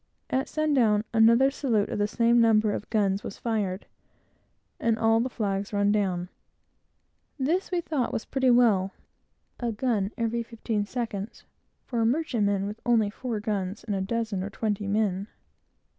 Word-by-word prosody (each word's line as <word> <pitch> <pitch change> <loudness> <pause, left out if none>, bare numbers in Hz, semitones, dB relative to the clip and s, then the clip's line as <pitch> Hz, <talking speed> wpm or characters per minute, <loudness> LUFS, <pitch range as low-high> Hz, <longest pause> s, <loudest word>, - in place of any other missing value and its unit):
At 265 +1 0
sun 310 -1 0
down, 215 -6 +3
another 230 +4 +5
salute 235 -7 0
of - - -3
the 205 - +2
same 235 +2 +3
number 220 -2 +4
of - - -5
guns 200 -3 +1
was - - -7
fired, 210 -5 -2 0.9
and 230 -1 +1
all 225 0 +3
the 250 +3 0
flags 200 -3 -2
run 205 0 +2
down. 185 -4 0 1.1
This 320 +8 0
we 355 -2 0
thought 300 -7 -1
was - - -3
pretty 265 -1 +1
well 215 -6 +4 0.7
a 240 -2 -1
gun 215 -3 -1
every 230 0 -1
fifteen 225 -2 -3
seconds 225 -3 -5 0.4
for 235 -3 -2
a - - +3
merchantman 225 -8 0
with 210 +2 -6
only 225 -4 +2
four 235 -1 -4
guns 205 -2 -3
and 220 -2 -3
a 190 - -1
dozen 220 -1 -2
or 195 - -4
twenty 205 -1 -2
men. 200 -1 0
220 Hz, 160 wpm, -27 LUFS, 205-240 Hz, 1.1 s, another